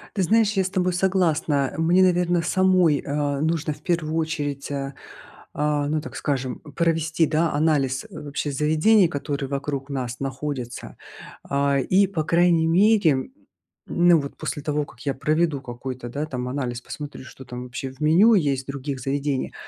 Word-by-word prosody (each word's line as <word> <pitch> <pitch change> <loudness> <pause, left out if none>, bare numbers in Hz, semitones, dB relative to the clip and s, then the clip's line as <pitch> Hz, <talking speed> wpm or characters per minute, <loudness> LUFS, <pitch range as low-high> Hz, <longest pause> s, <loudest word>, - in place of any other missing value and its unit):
Ты 195 - +1
знаешь, 220 +3 +3
я 195 -2 +2
с 185 - -2
тобой 185 -1 0
согласна. 165 -7 +1
Мне, 170 +3 +4
наверное, 175 -1 +2
самой, 180 -3 +3
э, 145 -1 -1
нужно 160 -1 0
в 150 - -17
первую 160 -2 -1
очередь, 150 -4 -2
э, 140 -1 -3 0.6
а, 150 -1 0
ну, 155 +1 0
так - - -9
скажем, 130 -3 -2 0.2
провести, 165 -1 +1
да, 160 +2 +1
анализ 145 -3 +1
вообще 145 0 -4
заведений, 155 +8 +4
которые 140 -2 -4
вокруг 140 0 -3
нас 125 -3 -4
находятся. 135 -2 -5 0.5
А, 140 0 +1
и 190 +8 +3
по 175 -5 -2
крайней 170 0 +3
мере, 195 +2 +4
м, 130 - -2 0.6
ну, 175 -1 +4
вот 140 -1 -6
после 145 - -4
того, 150 -1 -1
как 115 - -18
я 140 - 0
проведу 155 0 0
какой-то, 125 0 -7
да, 145 +5 -3
там 125 -4 -4
анализ, 125 -3 -3
посмотрю, 145 0 -8
что 130 - -12
там 125 0 -7
вообще 125 +2 -6
в 130 +3 -18
меню 175 +10 +5
есть 140 -7 +1
в - - -39
других 140 -1 -5
заведениях, 140 0 -2
150 Hz, 170 wpm, -23 LUFS, 140-170 Hz, 0.6 s, меню